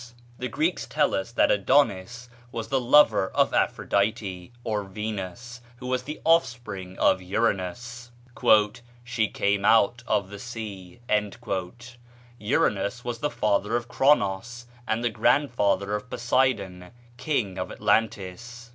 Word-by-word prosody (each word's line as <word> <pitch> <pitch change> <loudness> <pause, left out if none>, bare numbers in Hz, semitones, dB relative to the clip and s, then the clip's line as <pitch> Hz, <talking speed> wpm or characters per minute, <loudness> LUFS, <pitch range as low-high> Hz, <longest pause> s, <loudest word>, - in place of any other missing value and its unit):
The 125 - -2
Greeks 155 +9 -1
tell - - +1
us 95 +4 -2
that - - +3
Adonis 125 +1 +1 0.2
was 115 -2 -5
the 135 -1 +1
lover 120 -6 +5
of - - +3
Aphrodite, 100 -2 -1
or 105 -2 -1
Venus, 105 +4 -6 0.2
who 125 - -10
was 130 0 0
the 150 +4 -7
offspring 115 - 0
of 95 - +3
Uranus 115 +4 -2 0.9
"she 120 -3 0
came 100 -1 0
out 115 +2 +4
of 100 -2 0
the 100 - -8
sea;" 105 -4 -8 1.4
Uranus 105 +2 0
was 120 -1 -4
the 150 - -1
father 105 -2 0
of 120 0 -2
Chronos, 120 -2 +1 0.2
and 110 +2 -1
the 120 - +2
grandfather 110 -4 +1
of 105 +3 -4
Poseidon, 120 -9 0 0.3
king 125 -9 -2
of 90 - -4
Atlantis. 115 +3 -1
115 Hz, 125 wpm, -26 LUFS, 100-125 Hz, 1.4 s, lover